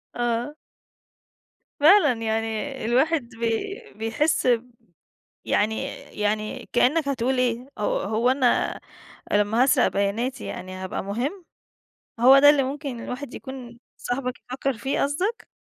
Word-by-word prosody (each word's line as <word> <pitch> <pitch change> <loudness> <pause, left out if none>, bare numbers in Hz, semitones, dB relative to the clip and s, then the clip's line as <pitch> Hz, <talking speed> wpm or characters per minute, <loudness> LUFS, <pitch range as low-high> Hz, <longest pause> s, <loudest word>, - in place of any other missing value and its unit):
آه. 240 +4 -1 1.2
فعلًا، 310 -2 +6
يعني 225 +4 -2
الواحد 265 +2 +1
بي 235 - -3
بيحس 255 +7 0 1.0
يعني 220 +3 +1 0.4
يعني 215 +4 -2
كأنك 280 +5 +3
هتقول 260 -1 0
إيه؟ 245 -1 0
هو 210 - 0
هو 220 +5 +1
أنا 260 -2 +1 0.5
لما 210 +4 +3
هاسرق 265 - +4
بياناتي 225 +6 -1
يعني 185 +1 -6
هبقى - - -4
مهم؟ 255 - -3 0.7
هو 260 +3 +8
ده 290 +1 +8
اللي 290 -2 +4
ممكن 275 -2 -4
الواحد 255 +1 -6
يكون 250 -3 -9 0.2
صاحبك 250 0 -3 0.2
بيفكر 265 -1 -2
فيه 270 +3 -1
قصدك؟ 365 +11 -1
250 Hz, 115 wpm, -24 LUFS, 225-280 Hz, 1.2 s, هو